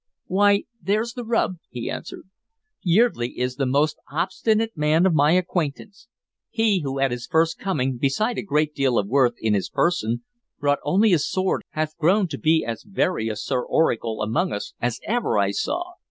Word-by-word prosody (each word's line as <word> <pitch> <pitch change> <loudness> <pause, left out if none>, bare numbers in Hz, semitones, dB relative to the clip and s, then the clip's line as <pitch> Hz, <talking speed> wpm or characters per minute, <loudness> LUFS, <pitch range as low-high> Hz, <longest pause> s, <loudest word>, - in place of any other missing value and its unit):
"Why, 200 +2 +3 0.2
there's 215 +6 0
the 245 - -6
rub," 225 -5 0
he 120 -1 -6
answered. - - -6 0.6
"Yeardley 175 - +2
is 125 +1 -2
the 135 -2 0
most 145 +4 +1
obstinate 215 +7 0
man 155 +3 +2
of 190 - +3
my 150 +1 +4
acquaintance. 180 - -2 0.4
He 225 -4 +2
who 135 -2 -3
at 135 -1 +2
his 120 -1 -5
first 160 +3 +1
coming, 130 -10 -1
beside 210 - 0
a - - -1
great 150 -4 0
deal 135 -4 +1
of 100 - +1
worth 125 0 +3
in 110 -1 0
his 100 -2 0
person, 145 -10 0 0.4
brought 145 -1 +1
only 195 +8 +3
his 160 -5 +2
sword 185 0 0
hath 155 0 -3
grown 185 +5 +3
to 140 - -5
be 160 +1 +2
as 115 -1 -4
very 185 - -1
a 110 - -3
Sir 125 +4 -2
Oracle 115 -7 0
among 160 - 0
us 105 - -5
as 120 0 -1
ever 235 - 0
I 100 -1 +2
saw. 350 - -3
155 Hz, 185 wpm, -23 LUFS, 125-195 Hz, 0.6 s, my